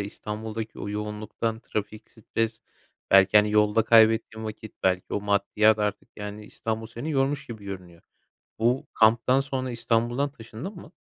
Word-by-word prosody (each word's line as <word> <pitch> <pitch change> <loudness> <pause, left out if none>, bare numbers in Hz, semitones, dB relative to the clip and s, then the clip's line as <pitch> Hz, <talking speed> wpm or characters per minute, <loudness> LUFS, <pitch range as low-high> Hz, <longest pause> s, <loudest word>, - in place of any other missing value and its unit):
İstanbul'daki 110 +2 -6
o - - -5
yoğunluktan, 105 +2 -3
trafik, 105 0 -5
stres 110 0 -3 0.5
belki, 95 +1 +6
hani, 105 0 +5
yolda 105 +1 +4
kaybettiğin 110 0 +4
vakit 110 0 -7
belki 95 -1 0
o 105 - 0
maddiyat 105 +2 +3
artık, 105 -1 -2
yani, 105 0 -7
İstanbul 110 +1 -4
seni 120 +7 -6
yormuş 140 0 0
gibi 110 -4 -9
görünüyor. 90 -4 -8 0.6
Bu 120 +4 +1
kamptan 115 +4 +4
sonra 135 -2 -3
İstanbul'dan 120 +4 0
taşındın 115 - -8
mı? 155 - -12
110 Hz, 140 wpm, -26 LUFS, 105-115 Hz, 0.6 s, belki